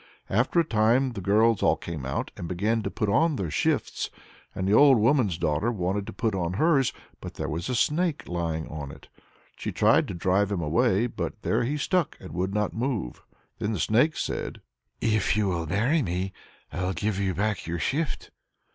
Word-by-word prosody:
After 120 - +2
a - - +5
time 120 +2 +2
the 105 -5 -6
girls 110 +3 +3
all - - +4
came 75 -6 -6
out, 65 - -3
and 85 - -6
began 105 +6 0
to - - -3
put 110 - -2
on 155 +10 +3
their 95 - -3
shifts, - - 0 0.5
and 95 - -2
the 100 - +2
old 140 +2 +7
woman's 115 - +2
daughter 80 +6 0
wanted 100 -1 -2
to - - -5
put 110 -3 -1
on 90 -2 -1
hers, 140 - +3 0.3
but - - -8
there - - -3
was 80 +3 -3
the 125 - -1
snake 155 +5 0
lying 85 -2 -2
on 75 -2 -6
it. - - -14 0.5
She - - -4
tried - - +3
to - - -5
drive 95 +3 +1
him 100 - -1
away, 95 +7 +2
but 115 -2 -5
there 115 +3 +1
he 145 +5 -1
stuck 175 +2 0
and 95 - -10
would 90 +2 -1
not 105 -1 0
move. 115 - -3 0.4
Then 110 0 -1
the 100 - -3
snake 125 - +2
said: - - -3 0.4
"If 110 -2 +2
you'll 90 -6 0
marry 120 - +2
me, 95 -2 -2 0.4
I'll 90 +1 -1
give 100 +2 -1
you 95 -2 0
back 105 -3 -1
your 85 +1 -2
shift." 140 - -2
105 Hz, 195 wpm, -26 LUFS, 90-120 Hz, 0.5 s, old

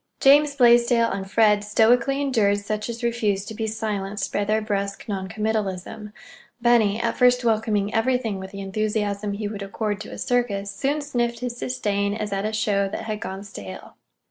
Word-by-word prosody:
James 285 +1 +5
Blaisdell 240 -2 +4
and 195 0 -4
Fred 210 -1 +4
stoically 235 +6 +3
endured 220 -7 +2
such 210 +2 -4
as 235 +1 -6
refused 215 -4 0
to - - -6
be 220 +1 -3
silenced 210 -2 -3
by 205 - +1
their 215 +2 +1
brusque 200 -2 -3
non 190 -3 -3
committalism. 210 0 -3 0.5
Benny, 230 -3 +3
at - - -1
first 250 0 +4
welcoming 215 -2 +1
everything 225 -3 0
with 190 0 -7
the 200 0 -8
enthusiasm 205 0 -2
he 205 +1 -3
would 205 -1 -6
accord 205 +1 -3
to - - -8
a - - -7
circus, 205 -5 -1
soon 285 +2 -1
sniffed 240 -4 -2
his 240 -1 -4
disdain, 205 -5 -1
as 210 -1 -3
at 195 +1 -1
a 215 - -1
show 205 -2 +1
that - - -5
had 215 -1 -4
gone 195 0 -6
stale. 100 - -9
215 Hz, 180 wpm, -23 LUFS, 200-235 Hz, 0.5 s, James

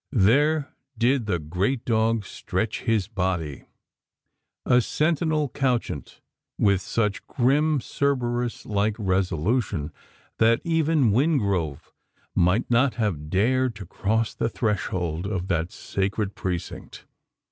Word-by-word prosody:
There 140 +8 +3 0.2
did 120 0 +2
the 90 -4 +1
great 90 - -2
dog 110 -2 +1
stretch 95 +3 -3
his 110 -5 +1
body 90 - -2 1.0
a 125 0 +5
sentinel 155 +2 +1
couchant 125 - -2 0.4
with 100 -2 +3
such 105 -2 -1
grim 145 +3 +2
Cerberus 120 -3 -1
like 105 +1 0
resolution, 95 - 0 0.5
that 115 +1 +4
even 160 -7 +2
Wingrove 100 - 0 0.4
might 90 +7 +2
not 120 0 +3
have 90 -10 -2
dared 125 +6 +2
to 105 -2 -8
cross 110 +5 -1
the - - -1
threshold 95 -6 -2
of 95 -3 -3
that 85 -1 0
sacred 100 +1 -2
precinct? 90 -2 -5
110 Hz, 110 wpm, -25 LUFS, 95-130 Hz, 1.0 s, a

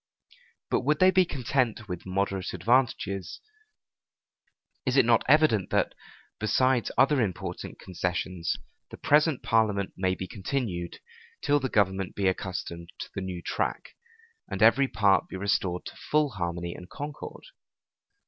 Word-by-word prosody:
But - - +3
would 150 +4 +2
they 185 +2 +6
be 185 0 +4
content 125 -6 -1
with 90 -1 -6
moderate 95 0 -1
advantages, 110 -7 0 1.4
is 130 -1 0
it 135 - +6
not 115 -1 +4
evident 145 -10 +4
that, - - +1 0.5
besides 120 +3 +2
other 135 +1 +4
important 95 -6 -4
concessions, 90 -1 -2 0.3
the - - -10
present 150 -1 +3
parliament 105 -4 +1
may 95 0 0
be 95 - -6
continued, 95 -3 -3 0.4
till 145 0 +3
the 130 -1 -2
government 95 -4 +1
be 100 - -1
accustomed 90 -2 -3
to - - -7
the - - -4
new 90 -2 -5
track, - - -3 0.5
and - - 0
every 140 0 +6
part 100 -4 +3
be - - -8
restored 95 -2 -1
to - - -8
full 150 -2 +1
harmony 85 -3 -3
and 90 0 -11
concord? 145 0 -7
105 Hz, 140 wpm, -28 LUFS, 95-130 Hz, 1.4 s, they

